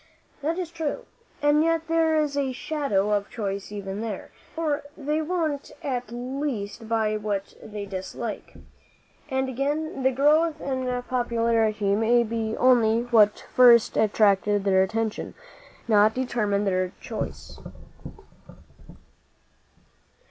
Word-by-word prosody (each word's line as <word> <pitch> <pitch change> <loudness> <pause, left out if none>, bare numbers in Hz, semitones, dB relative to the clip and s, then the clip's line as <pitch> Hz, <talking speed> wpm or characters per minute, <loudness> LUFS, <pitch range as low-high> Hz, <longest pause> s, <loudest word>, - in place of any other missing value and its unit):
"That 320 +4 -1
is 355 -3 -4
true. 325 -3 -4 0.4
And 295 +1 +4
yet 330 0 0
there 325 -1 +2
is 295 -2 -1
a 275 -2 -1
shadow 245 -8 -1
of 205 -1 0
choice 200 -4 -4
even 200 0 -5
there; 220 -4 -5 0.2
for 310 -3 -1 0.2
they 300 +1 -1
won't 315 -4 -2
at 250 -3 -2
least 240 -3 -4
buy 220 -2 +1
what 205 -2 -3
they 210 -1 -7
dislike. 195 +3 -6 0.7
And 265 -1 0
again 280 +3 -2
the 260 - +4
growth 300 +4 +3
in 255 -2 -2
popularity 230 -4 +1
may 230 +3 +3
be 225 -1 -3
only 235 -2 +4
what 210 -3 +4
first 240 -3 +6
attracted 205 -1 +3
their 190 -1 +3
attention 220 +3 -2 0.5
not 215 -1 +4
determined 210 -6 0
their 185 -1 0
choice." - - -6
235 Hz, 120 wpm, -25 LUFS, 210-285 Hz, 0.7 s, first